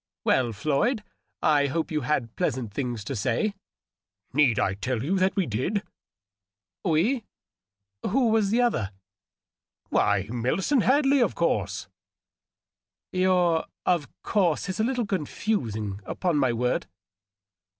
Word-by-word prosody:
" -, -, -68 dB
Well, 125 Hz, -3 st, +3 dB
Floyd, 155 Hz, -, 0 dB, 0.4 s
I 145 Hz, -2 st, +4 dB
hope 160 Hz, +4 st, -2 dB
you 155 Hz, -1 st, 0 dB
had 125 Hz, -7 st, -1 dB
pleasant 120 Hz, -5 st, -2 dB
things 120 Hz, -4 st, -3 dB
to 135 Hz, +6 st, -4 dB
say." 130 Hz, -, 0 dB, 0.4 s
" 95 Hz, +3 st, -50 dB
Need 135 Hz, -6 st, +4 dB
I -, -, +2 dB
tell 115 Hz, +4 st, -2 dB
you 175 Hz, +8 st, 0 dB
that 190 Hz, +1 st, +2 dB
we 195 Hz, -3 st, +2 dB
did 145 Hz, -, -1 dB, 0.4 s
?" 95 Hz, 0 st, -66 dB
" 95 Hz, -3 st, -67 dB
We? 215 Hz, -, +2 dB, 0.9 s
Who 245 Hz, +3 st, +3 dB
was 220 Hz, -2 st, +3 dB
the 235 Hz, +4 st, +3 dB
other 115 Hz, -, 0 dB, 0.3 s
?" -, -, -67 dB
" -, -, -48 dB
Why, 100 Hz, -1 st, +2 dB
Millicent 160 Hz, -, +1 dB
Hadley, 275 Hz, +3 st, +4 dB
of 240 Hz, -, +2 dB
course." -, -, 0 dB, 0.6 s
" -, -, -67 dB
Your 180 Hz, -3 st, +3 dB
^ -, -, -7 dB, 0.2 s
of 170 Hz, -5 st, +2 dB, 0.2 s
course' 185 Hz, -4 st, +1 dB
is 185 Hz, -, -3 dB
a -, -, +3 dB
little 250 Hz, 0 st, 0 dB
conftising, 130 Hz, -, -2 dB
upon 170 Hz, -, -1 dB
my 130 Hz, -4 st, +3 dB
word." 125 Hz, +2 st, 0 dB
150 Hz, 150 wpm, -26 LUFS, -, 0.9 s, I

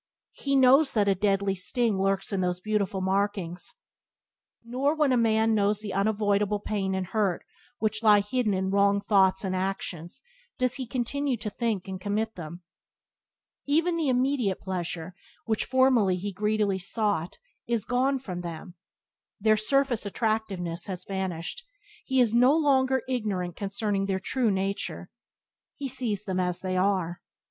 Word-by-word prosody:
He 275 Hz, -1 st, -1 dB
knows 270 Hz, +3 st, +5 dB
that 210 Hz, -3 st, +2 dB
a 200 Hz, -, +5 dB
deadly 195 Hz, 0 st, +1 dB
sting 200 Hz, +2 st, 0 dB
lurks 195 Hz, +1 st, 0 dB
in 190 Hz, -, 0 dB
those 180 Hz, -1 st, -1 dB
beautiful 200 Hz, -2 st, -1 dB
markings. 190 Hz, -2 st, -1 dB, 0.9 s
Nor, 260 Hz, +6 st, 0 dB
when 300 Hz, -3 st, +2 dB
a -, -, +4 dB
man 225 Hz, -1 st, +3 dB
knows 205 Hz, 0 st, +1 dB
the 205 Hz, -2 st, -5 dB
unavoidable 205 Hz, 0 st, +1 dB
pain 195 Hz, -2 st, -2 dB
and 190 Hz, -1 st, -2 dB
hurt 195 Hz, -2 st, -1 dB, 0.3 s
which 215 Hz, 0 st, -1 dB
lie 210 Hz, -2 st, +6 dB
hidden 210 Hz, 0 st, 0 dB
in 190 Hz, 0 st, -1 dB
wrong 200 Hz, 0 st, +3 dB
thoughts 195 Hz, -2 st, +3 dB
and 190 Hz, -1 st, -1 dB
acts, 185 Hz, -3 st, -4 dB, 0.3 s
does 255 Hz, -1 st, +1 dB
he 260 Hz, -2 st, -4 dB
continue 260 Hz, +2 st, -1 dB
to 210 Hz, -1 st, -5 dB
think 220 Hz, -5 st, -2 dB
and 190 Hz, -1 st, -6 dB
commit 215 Hz, +3 st, -1 dB
them. 170 Hz, +1 st, -9 dB, 1.0 s
Even 330 Hz, +4 st, +2 dB
the 320 Hz, -4 st, 0 dB
immediate 250 Hz, -6 st, +1 dB
pleasure 180 Hz, -2 st, -4 dB, 0.3 s
which 220 Hz, -2 st, 0 dB
formerly 255 Hz, -7 st, +3 dB
he 200 Hz, +3 st, -4 dB
greedily 210 Hz, -1 st, 0 dB
sought 200 Hz, -3 st, -1 dB, 0.3 s
is 230 Hz, -3 st, 0 dB
gone 260 Hz, +3 st, +1 dB
from 185 Hz, -9 st, -6 dB
them; 170 Hz, +1 st, -7 dB, 0.7 s
their 215 Hz, +1 st, +4 dB
surface 260 Hz, +2 st, +1 dB
attractiveness 200 Hz, -5 st, -2 dB
has 185 Hz, -2 st, -5 dB
vanished; 190 Hz, -, -4 dB, 0.4 s
he 265 Hz, -1 st, +1 dB
is 235 Hz, -3 st, +3 dB
no 250 Hz, +6 st, +5 dB
longer 265 Hz, -4 st, +2 dB
ignorant 200 Hz, -9 st, -2 dB
concerning 200 Hz, 0 st, -2 dB
their 190 Hz, -1 st, 0 dB
true 240 Hz, +4 st, 0 dB
nature; 195 Hz, +1 st, -3 dB, 0.6 s
he 280 Hz, -, -4 dB
sees 240 Hz, -6 st, -2 dB
them 185 Hz, -2 st, -2 dB
as 180 Hz, -1 st, -1 dB
they 185 Hz, -1 st, -2 dB
are. 185 Hz, -2 st, 0 dB
205 Hz, 155 wpm, -27 LUFS, 190-240 Hz, 1.0 s, lie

